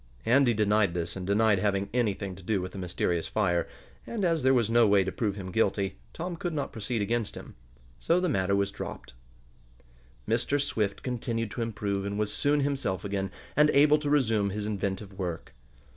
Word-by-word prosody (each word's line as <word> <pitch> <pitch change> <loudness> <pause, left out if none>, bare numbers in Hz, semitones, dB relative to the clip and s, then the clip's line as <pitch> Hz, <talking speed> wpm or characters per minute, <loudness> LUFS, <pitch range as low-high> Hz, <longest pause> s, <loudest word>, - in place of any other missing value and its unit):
Andy 120 0 +4
denied 105 -3 +2
this 85 -1 -3
and 95 -1 -5
denied 105 0 +3
having 100 0 0
anything 105 -5 0
to 95 - -12
do 100 +2 0
with 90 0 -5
the 95 - -7
mysterious 90 -2 -1
fire, 90 -5 +1 0.4
and, 215 -5 -2
as 165 -3 +2
there 130 - +4
was 120 -5 +3
no 115 0 +4
way 100 -1 +5
to 95 - -3
prove 105 -2 -1
him 95 -2 -6
guilty, 95 -2 0
Tom 175 +1 -5
could 170 -1 -3
not 145 - -2
proceed 110 0 -2
against 115 0 -1
him. - - -10 0.5
So 170 +2 +2
the 180 - 0
matter 100 - +1
was 100 0 +1
dropped. 60 - -7 1.1
Mr. 125 +6 +1
Swift 110 -8 -1
continued 115 -3 -2
to 120 - -4
improve, 105 -3 -2
and 100 +1 -3
was 105 -1 -1
soon 145 0 +2
himself 135 -11 -1
again, 100 -1 -2 0.3
and 150 +1 +5
able 150 +1 +5
to 150 -1 -2
resume 115 -8 +2
his 105 +1 -3
inventive 100 -1 -3
work. 90 -3 -4
105 Hz, 190 wpm, -28 LUFS, 100-125 Hz, 1.1 s, way